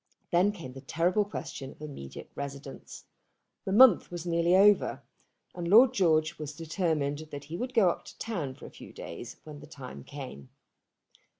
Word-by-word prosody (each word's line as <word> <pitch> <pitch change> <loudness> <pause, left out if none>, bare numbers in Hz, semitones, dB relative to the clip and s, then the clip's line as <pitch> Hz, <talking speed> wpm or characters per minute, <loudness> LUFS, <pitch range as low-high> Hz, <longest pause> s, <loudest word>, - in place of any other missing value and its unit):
Then 180 +4 +4
came 165 -11 -9
the 135 - -9
terrible 175 +8 +1
question 135 -9 -6
of - - -15
an 150 -1 -7
immediate 70 - -9
residence. 140 -1 -8 0.6
The 190 - -2
month 225 -1 +7
was 175 -1 -6
nearly 170 +1 +2
over, 205 +2 +4 0.5
and 175 -1 -5
Lord 230 +7 +7
George 160 -4 +2
had 150 -2 -5
determined 155 -3 -1
that 145 -1 -7
he 155 +4 -7
would 250 +6 -4
go 195 -6 +5
up - - -8
to - - -12
town 165 - -4
for - - -12
a - - -10
few - - -12
days - - -8
when 150 -2 -10
the 150 - -12
time 135 -4 -9
came. 130 - -9
165 Hz, 180 wpm, -29 LUFS, 140-190 Hz, 0.6 s, month